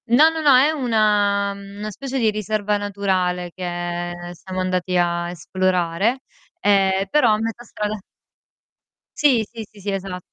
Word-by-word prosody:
No, 270 +7 +6
no, 325 0 -3
no, 285 -4 +6
è 275 +4 +5
una 210 -7 +2
mhmm, 200 0 -11
una 210 +1 -5
specie 270 +6 -5
di 225 -4 +2
riserva 210 0 -1
naturale 185 -3 -1
che 185 - -8
ehm 175 0 -4
siamo 185 +2 -7
andati 185 0 0
a 175 0 0
esplorare, 185 +6 0 0.4
ehm, 195 -1 +3
però 240 -3 +4
a - - +2
metà 225 +2 -4
strada 210 -2 -4 1.2
Sì, 255 -7 +3
sì, 225 -3 -7
sì, 205 -1 -6
esa 190 -1 -4
200 Hz, 150 wpm, -21 LUFS, 180-220 Hz, 1.2 s, No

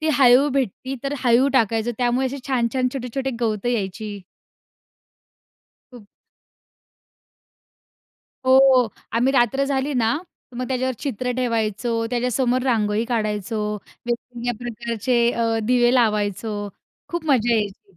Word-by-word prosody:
ती 315 - -1
हळीव 260 +2 +6
भेटती, 260 0 -2
तर 275 +1 -1
हळीव 245 +3 +4
टाकायचो, 225 -1 +2
त्यामुळे 250 +1 +1
असे 270 +2 -4
छान-छान 255 0 +1
छोटे-छोटे 265 +1 -3
गवतं 220 -1 -1
यायची. 210 -2 -3 1.7
खूप. 235 -5 -13 2.4
हो. 260 -2 +5 0.3
आम्ही 245 +4 +2
रात्र 270 +1 +2
झाली 275 +1 -1
ना, 230 0 +2 0.4
मग 255 +1 -3
त्याच्यावर 260 0 -1
चित्र 250 -3 -3
ठेवायचो, 230 -1 -1
त्याच्यासमोर 250 +1 0
रांगोळी 220 -4 +1
काढायचो, 215 -3 -2 0.5
वेगवेगळ्या 240 0 -3
प्रकारचे 235 0 0
अ, 230 -1 0
दिवे 245 +1 +3
लावायचो. 210 -2 0 0.4
खूप 345 -2 -4
मजा 240 -5 +3
यायची. 200 -3 -4
240 Hz, 110 wpm, -22 LUFS, 225-260 Hz, 2.4 s, हळीव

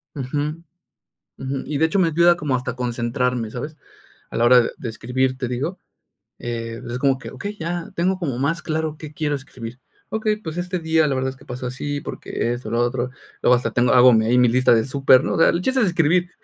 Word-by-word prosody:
Ujú. 150 +4 -3 0.8
Ujú, 135 0 -3
y 150 - -3
de 160 - +3
hecho 195 +5 -1
me 170 -3 +4
ayuda 170 +2 +4
como 150 -5 -2
hasta 125 0 -2
concentrarme, 120 -1 -1
¿sabes? 150 +7 -6 0.5
A - - -6
la 115 - +2
hora 125 +1 +7
de 115 - 0
de 125 - -6
escribir 130 +3 -1
te 125 -2 -2
digo, 140 +10 -3 0.6
eh, 115 0 -5
es 125 +1 -3
como 135 -1 +2
que, 130 - -9
okey, 205 +11 -6
ya 170 +2 -4
tengo 185 +2 +1
como 135 -8 -2
más 155 +5 0
claro 155 -1 -2
qué 155 -1 -9
quiero 150 -1 -1
escribir. 125 -3 -9 0.3
Okey, 215 -1 0
pues, 165 -5 -7
este 180 +1 -2
día 160 -1 +2
la 135 - 0
verdad 130 0 0
es - - -13
que - - -18
pasó 125 +1 -5
así, 145 +3 -4
porque 120 - -3
esto, 120 -2 -6
lo 115 - +1
otro, 120 +1 0 0.3
luego 125 - +5
hasta 125 - -1
tengo 125 0 +2
hago 125 0 +8
ahí 120 +3 +2
mi 125 -1 +6
lista 125 +1 +4
de 110 -1 +3
súper, 135 -1 +4
¿no? - - -1
O - - -1
sea, - - +6
el 170 - 0
chiste 260 +4 +1
es 205 - +3
escribir. 175 +1 +2
135 Hz, 225 wpm, -22 LUFS, 125-160 Hz, 0.8 s, hago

